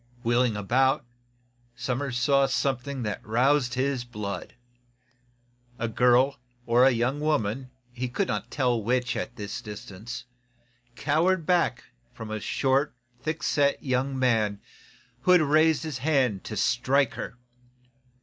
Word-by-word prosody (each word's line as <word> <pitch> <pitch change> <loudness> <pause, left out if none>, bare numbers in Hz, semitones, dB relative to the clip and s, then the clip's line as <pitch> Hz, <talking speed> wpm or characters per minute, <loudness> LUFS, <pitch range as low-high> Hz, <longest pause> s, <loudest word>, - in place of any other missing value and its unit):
Wheeling 120 -2 +2
about, 125 +6 +2 0.7
Somers 125 +1 -2
saw 140 +2 +3
something 135 -1 -1
that 105 -2 -3
aroused 125 +3 +2
his 130 -1 0
blood. 105 -6 -6 1.2
A 115 - -2
girl, 125 +4 +3 0.3
or 125 +2 +5
young 125 +3 0
woman, 135 -5 -1 0.2
he 125 0 -3
could 185 +10 -1
not - - -3
tell 125 -5 +1
which, 125 +3 0
at 120 - -4
the 105 -4 -6 0.2
distance, 105 +3 -8 0.7
cowered 165 +5 +1
back 170 -8 +1 0.3
from 110 -2 -7
a 110 - -2
short, 135 +5 0 0.3
thick 155 +4 -3
set 140 -2 +1
young 130 0 0
man 110 -5 +1 0.6
who 180 - +4
had 180 - +6
raised 155 +1 +3
his 155 -5 -4
hand 130 -8 +1
to 105 - -5
strike 130 +4 +2
her. 125 - -6
125 Hz, 130 wpm, -27 LUFS, 120-140 Hz, 1.2 s, had